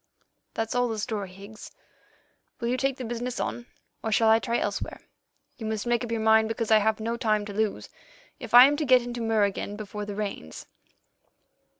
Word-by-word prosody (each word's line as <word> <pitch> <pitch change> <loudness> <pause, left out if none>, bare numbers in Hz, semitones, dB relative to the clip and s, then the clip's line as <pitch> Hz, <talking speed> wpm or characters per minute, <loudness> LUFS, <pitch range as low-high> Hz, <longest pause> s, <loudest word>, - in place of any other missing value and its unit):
That's 225 0 -2
all 245 0 +2
the 225 -2 -3
story, 210 -3 -3
Higgs. 200 +4 -12 0.9
Will 235 - -2
you 250 - +1
take 270 +1 -1
the 255 - -5
business 240 +2 -4
on, 240 0 -4 0.4
or 220 - -2
shall 220 +1 +4
I 220 +1 +6
try 235 +1 -1
elsewhere? - - -3 0.6
You 220 - -5
must 220 0 -3
make 240 0 +1
up 240 - -5
your 230 - -1
mind, 220 0 +4
because 225 0 -3
I 220 - +7
have 215 +1 +1
no 230 +2 -2
time 215 -2 0
to 205 - -7
lose, 215 0 -1 0.5
if 240 -3 -2
I 245 +1 +11
am 285 +2 +3
to 305 - -1
get 255 -2 +5
into 240 0 -5
Mur 225 -2 +2
again 200 0 -2
before 210 0 -6
the 205 -1 -6
rains." 200 - -6
225 Hz, 205 wpm, -26 LUFS, 215-240 Hz, 0.9 s, I